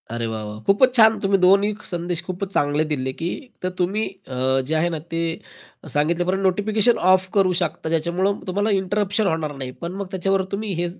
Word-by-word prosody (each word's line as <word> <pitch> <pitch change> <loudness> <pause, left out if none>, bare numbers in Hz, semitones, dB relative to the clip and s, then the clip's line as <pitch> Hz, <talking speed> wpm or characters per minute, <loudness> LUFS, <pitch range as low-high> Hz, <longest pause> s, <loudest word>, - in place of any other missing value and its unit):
अरे, 115 +1 -3
वा, 110 -1 -4
वा! 105 0 -7
खूपच 250 +6 +4
छान. 220 -2 +6
तुम्ही 195 0 +3
दोन्ही 195 +3 +4
संदेश 175 -1 -2
खूपच 185 +2 -4
चांगले 145 -1 +2
दिले, 130 -4 -2
की 165 +5 -3 0.3
तर 185 - -1
तुम्ही 205 +5 0 0.2
अ, 130 +1 +1
जे 155 - -1
आहे 165 +2 +2
ना 165 -2 -3
ते 165 0 -1 0.7
सांगितल्यापर्यंत 175 +6 +1
नोटिफिकेशन 210 +4 +2
ऑफ 185 0 +3
करू 195 -3 +3
शकता 160 - -2
ज्याच्यामुळं 175 +5 0
तुम्हाला 205 +3 0
इंटरप्शन 205 +2 0
होणार 160 -4 -1
नाही. 130 -2 -5
पण 170 0 -4
मग 200 - -5
त्याच्यावर 195 +1 +1
तुम्ही 205 +1 -3
हेच 175 +1 -4
180 Hz, 185 wpm, -22 LUFS, 155-200 Hz, 0.7 s, छान